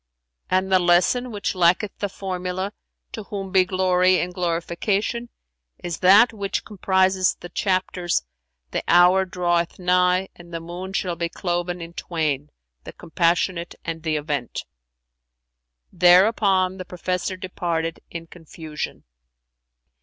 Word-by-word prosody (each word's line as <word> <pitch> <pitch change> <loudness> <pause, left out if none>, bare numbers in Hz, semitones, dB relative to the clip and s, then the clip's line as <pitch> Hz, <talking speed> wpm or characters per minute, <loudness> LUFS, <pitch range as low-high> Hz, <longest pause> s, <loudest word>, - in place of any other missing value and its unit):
'[FN#390] 185 - +3
And 190 +1 -2
the 185 - +5
lesson, 180 +8 +3
which 205 -2 -2
lacketh 180 +3 +2
the 205 - -2
formula, 185 +1 -4 0.4
'To 220 - -6
Whom 195 -2 -6
be 185 -1 +4
glory 185 0 +3
and 180 +1 -3
glorification,' 180 +7 -1 0.5
is 175 -2 -5
that 205 +6 +6
which 200 -2 -3
comprises 190 -2 +2
the 175 - -11
chapters, 185 - 0 0.5
The - - -2
Hour 180 +2 +5
draweth 175 -2 -1
nigh 180 +1 +2
and 175 0 -14
the 165 - -4
Moon 175 +3 -7
shall 180 -2 -1
be 170 0 -2
cloven 175 0 -3
in 165 0 -8
twain[FN#391]; 150 -5 -2 0.4
The - - -8
Compassionate 170 +1 0
and 165 -1 -4
The 160 -1 -1
Event."[FN#392] - - -9
Thereupon 185 +1 +4
the 185 - -6
professor 180 +1 -3
departed 170 -3 -3
in 165 -1 -7
confusion. 160 -2 -8
180 Hz, 130 wpm, -23 LUFS, 170-190 Hz, 0.5 s, that